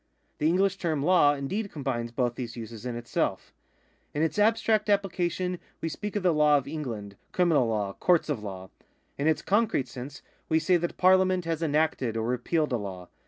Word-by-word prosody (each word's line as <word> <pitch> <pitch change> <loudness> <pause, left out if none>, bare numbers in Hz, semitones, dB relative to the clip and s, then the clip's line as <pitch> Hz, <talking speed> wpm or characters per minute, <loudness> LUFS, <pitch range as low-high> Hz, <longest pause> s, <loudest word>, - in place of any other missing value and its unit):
^ - - -47
The 150 - +2
English 190 +3 +2
term 160 -6 -1
law 150 -4 +5
indeed 195 +10 -3
combines 130 -5 -3
both 120 0 0
these 120 -1 -6
uses 115 +1 -7
in 120 - -3
itself. 120 0 -2 0.6
In 150 - +1
its 160 +5 0
abstract 215 0 +3
appHcation 180 -3 0 0.2
we 165 - -2
speak 205 +6 -5
of 205 - -1
the 180 -2 +4
law 150 -1 +5
of 140 -1 -4
England, 115 -10 -5
criminal 165 -9 +3
law, 105 -3 -1
courts 175 - +2
of 145 -8 -2
law. 95 -2 -7 0.5
In 145 - +1
its 160 - +2
concrete 205 - +1
sense, 135 +2 -9 0.3
we 160 - +3
say 160 +3 +3
that 170 0 -3
Parliament 185 -1 +4
has 165 -1 -2
enacted 150 -7 0
or 110 - -1
repealed 140 +5 0
a - - +2
law. 95 -4 -7
150 Hz, 190 wpm, -27 LUFS, 120-180 Hz, 0.6 s, law